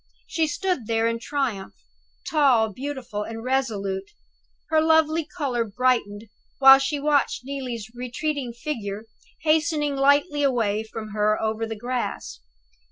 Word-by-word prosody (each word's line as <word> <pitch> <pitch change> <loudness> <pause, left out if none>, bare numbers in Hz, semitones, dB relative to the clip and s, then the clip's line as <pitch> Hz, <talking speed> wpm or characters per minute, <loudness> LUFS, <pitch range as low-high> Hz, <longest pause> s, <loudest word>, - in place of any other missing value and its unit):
She 320 -1 0
stood 360 - -2
there 225 0 +1
in 230 0 0
triumph, 245 -8 -3 0.5
tall, 260 -8 +3
beautiful, 255 -4 -5
and 225 +1 -6
resolute. 205 -7 -1 0.6
Her 315 -1 +4
lovely 320 0 +3
color 270 -9 -2
brightened 225 -2 0 0.3
while 270 0 +9
she 285 +2 -1
watched 285 -3 +1
Neelie's 250 -6 -5
retreating 250 +2 -3
figure 225 -5 -5 0.4
hastening 310 -2 +1
lightly 285 +2 +3
away 225 -6 +1
from 220 0 -8
her 210 0 +1
over 220 +1 -1
the 225 - -5
grass. 245 - -4
255 Hz, 125 wpm, -24 LUFS, 220-290 Hz, 0.6 s, while